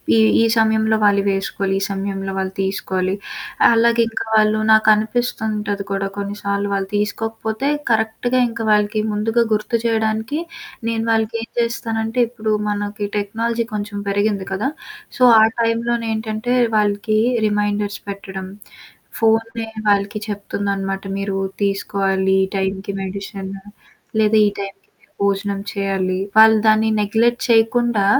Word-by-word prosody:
ఈ - - +4 0.2
ఈ - - +5
సమయంలో 220 0 +3
వాళ్ళివేసుకోవాలి, 195 -1 +1
ఈ - - -7
సమయంలో 195 0 -3
వాళ్ళు 190 0 -2
తీసుకోవాలి, 190 -1 -1 0.5
అలాగే 235 0 +4
ఇంకా 225 - -4
వాళ్ళు 215 0 +4
నాకనిపిస్తుంటది 215 -1 +2
కూడా 195 0 -1
కొన్నిసార్లు 200 0 -2
వాళ్ళు 195 -1 -1
తీసుకోకపోతే 220 +4 -2 0.2
కరెక్ట్‌గా 225 +3 +1
ఇంకా 230 0 -5
వాళ్ళకి 210 +1 +2
ముందుగా 220 +3 +1
గుర్తు 215 +3 0
జేయడానికి 220 +4 0 0.5
నేను 225 -1 -1
వాళ్ళకేం 225 +1 -1
జేస్తానంటే 230 0 -1
ఇప్పుడు 220 -2 -2 0.2
మనకి 205 0 -3
టెక్నాలజీ 230 +3 -1
కొంచెం 205 0 -4
పెరిగింది 200 -1 0
కదా! 205 +8 -1 0.5
సో, 255 - +2 0.2
ఆ - - +7 0.2
టైంలోనేంటంటే 230 0 -1 0.2
వాళ్ళకి 210 +1 +1 0.3
రిమైండర్స్ 205 0 -1
పెట్టడం. 195 -1 -6 0.7
ఫోనే 225 0 +1 0.2
వాళ్ళకి 200 +1 +1
చెప్తుందనమాట. 200 -1 -3 0.2
మీరు 195 -1 -2 0.3
తీసుకోవాలి 195 -1 0
ఈ - - -11
టైం‌కి 190 +1 -2
మెడిషను 195 0 -6 0.6
లేదా 215 0 +4
ఈ - - +2
టైం‌కి 195 0 -7
మీరు - - -30
భోజనం 200 0 0
చేయాలి. 195 -2 -1 0.2
వాళ్ళు 220 0 +8
దాన్ని 215 0 +4
నెగ్లెట్ 225 +4 +2
చేయకుండా 230 -2 +3
210 Hz, 115 wpm, -19 LUFS, 200-225 Hz, 0.7 s, వాళ్ళు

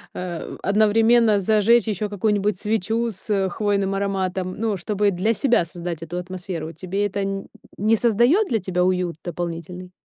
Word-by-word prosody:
э, 175 -2 -5
одновременно 220 +2 +4
зажечь 220 +4 +3
ещё 210 0 -2
какую-нибудь 205 -1 0
свечу 225 +2 0
с 195 -1 -1
хвойным 200 0 0
ароматом. 190 -2 -2
Ну, 220 -1 -1
чтобы 205 +2 0
для 195 +5 +1
себя 235 -6 +2
создать 170 -1 -6
эту 165 +2 -6
атмосферу. 180 -3 -5
Тебе 195 +3 -2
это 205 0 -3
н 195 0 -3 0.3
не 215 +3 +3
создаёт 240 - +3
для 230 -4 0
тебя 180 -2 -1
уют 180 -2 0
дополнительный? 175 +1 -6
195 Hz, 150 wpm, -22 LUFS, 180-215 Hz, 0.3 s, одновременно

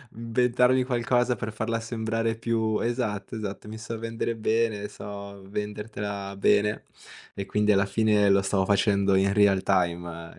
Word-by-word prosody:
inventarmi 125 +2 +2
qualcosa 125 0 +1
per 110 +1 -5
farla 110 +1 -2
sembrare 115 0 -2
più 110 -1 0
esatto, 115 -3 -2
esatto, 105 -1 -6
mi 110 +1 -7
so 110 +1 -6
vendere 115 0 -3
bene, 110 -2 0
so 100 -1 -9
vendertela 105 -1 -5
bene 105 +1 +2 0.5
e 100 - -5
quindi 105 +2 +2
alla 100 -1 +3
fine 105 -1 +2
lo 100 0 +5
stavo 95 -1 0
facendo 100 -1 +2
in 100 +1 +3
real 100 -2 +4
time 85 -2 -1
105 Hz, 145 wpm, -26 LUFS, 100-115 Hz, 0.5 s, lo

